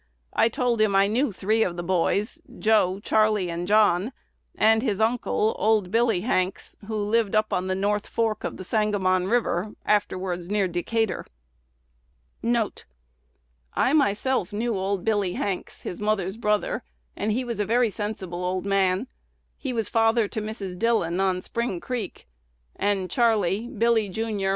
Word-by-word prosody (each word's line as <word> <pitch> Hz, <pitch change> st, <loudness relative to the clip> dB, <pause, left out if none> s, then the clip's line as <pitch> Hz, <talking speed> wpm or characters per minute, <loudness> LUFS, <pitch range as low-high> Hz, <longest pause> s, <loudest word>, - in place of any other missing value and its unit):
I 225 Hz, -, +4 dB
told 235 Hz, -1 st, 0 dB
him 210 Hz, -2 st, +3 dB
I 195 Hz, 0 st, +5 dB
knew 235 Hz, +5 st, +1 dB
three 215 Hz, +4 st, 0 dB
of 175 Hz, -5 st, 0 dB
the 175 Hz, -, -3 dB
boys, 195 Hz, -, 0 dB, 0.2 s
Joe, 210 Hz, -4 st, +2 dB
Charley, 215 Hz, -5 st, +2 dB
and 170 Hz, +1 st, -4 dB
John, 210 Hz, +1 st, +3 dB, 0.4 s
and 220 Hz, +1 st, +4 dB
his 215 Hz, -5 st, -1 dB
uncle, 220 Hz, -1 st, +1 dB
old 210 Hz, -4 st, +2 dB
Billy 225 Hz, -4 st, +2 dB
Hanks, 185 Hz, -3 st, -1 dB
who 220 Hz, -, -3 dB
lived 210 Hz, 0 st, +1 dB
up 215 Hz, 0 st, +2 dB
on 180 Hz, +1 st, 0 dB
the 185 Hz, -, 0 dB
North 205 Hz, +2 st, 0 dB
Fork 225 Hz, -2 st, -1 dB
of -, -, -4 dB
the -, -, -7 dB
Sangamon 190 Hz, -3 st, +1 dB
River, 210 Hz, -3 st, 0 dB
afterwards 185 Hz, -4 st, 0 dB
near 205 Hz, -2 st, +1 dB
Decatur."1 60 Hz, -, -5 dB
1 225 Hz, -3 st, +1 dB, 1.0 s
"I 260 Hz, -, +2 dB
myself 260 Hz, -, +1 dB
knew 225 Hz, +2 st, -1 dB
old 195 Hz, -1 st, -2 dB
Billy 205 Hz, -5 st, +1 dB
Hanks, 195 Hz, -3 st, -4 dB
his 180 Hz, -, -6 dB
mother's 205 Hz, -3 st, 0 dB
brother, 210 Hz, -2 st, 0 dB, 0.3 s
and 215 Hz, -, -1 dB
he 250 Hz, +4 st, 0 dB
was 235 Hz, -3 st, -4 dB
a -, -, +2 dB
very 235 Hz, +1 st, +2 dB
sensible 190 Hz, -4 st, -4 dB
old 185 Hz, +1 st, -2 dB
man. 195 Hz, +1 st, +2 dB, 0.5 s
He 270 Hz, -, -4 dB
was 225 Hz, -4 st, -1 dB
father 225 Hz, -1 st, +3 dB
to 220 Hz, -, -3 dB
Mrs. 200 Hz, -4 st, -6 dB
Dillon, 220 Hz, -7 st, +1 dB
on 185 Hz, -1 st, +1 dB
Spring 235 Hz, -6 st, -2 dB
Creek; 230 Hz, -, -5 dB, 0.5 s
and 200 Hz, -2 st, 0 dB
Charley, 215 Hz, 0 st, +1 dB
Billy, 230 Hz, -3 st, +1 dB
jr. 210 Hz, -1 st, -2 dB
205 Hz, 155 wpm, -25 LUFS, 185-225 Hz, 1.0 s, I